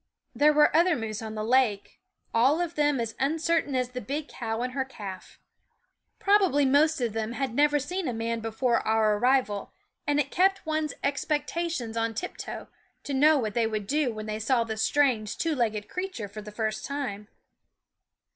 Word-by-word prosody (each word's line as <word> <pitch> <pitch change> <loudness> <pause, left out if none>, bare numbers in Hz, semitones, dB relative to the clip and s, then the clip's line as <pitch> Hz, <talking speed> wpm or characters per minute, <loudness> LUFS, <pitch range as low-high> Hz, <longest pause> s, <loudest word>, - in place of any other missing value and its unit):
There 290 +5 +5
were 300 0 +4
other 340 +1 +4
moose 220 -2 -4
on 220 -1 -6
the 215 - -3
lake, 230 -3 +1 0.3
all 260 +8 +4
of 345 -1 -2
them 295 -3 +2
as 230 -1 -2
uncertain 315 0 +1
as 250 -1 0
the 250 0 -6
big 295 +3 -4
cow 225 -1 -3
and 250 0 -3
her 270 0 0
calf. 200 -8 -9 0.8
Probably 385 -8 +3
most 295 +3 +3
of 235 -4 -1
them 225 +1 -3
had 265 -2 -2
never 295 +3 +3
seen 350 +5 -3
a - - 0
man 230 +1 -2
before 225 +2 0
our 215 -1 +2
arrival, 245 -4 +1 0.4
and 290 0 +2
it 280 -1 -1
kept 385 +1 +2
one's 310 -1 -1
expectations 295 -2 -2
on 225 0 -1
tiptoe 360 - -6 0.4
to 285 - -4
know 300 +3 +5
what 220 -6 -2
they 230 -1 +2
would 215 -2 -3
do 285 +2 +1
when 215 -1 -6
they 215 0 -4
saw 235 +2 +2
the 220 -1 -4
strange 230 -3 +1
two 330 -1 0
legged 220 -6 -1
creature 365 - -4
for 210 +2 -9
the 210 0 -9
first 215 0 -2
time. 250 -8 -4
255 Hz, 185 wpm, -27 LUFS, 220-295 Hz, 0.8 s, There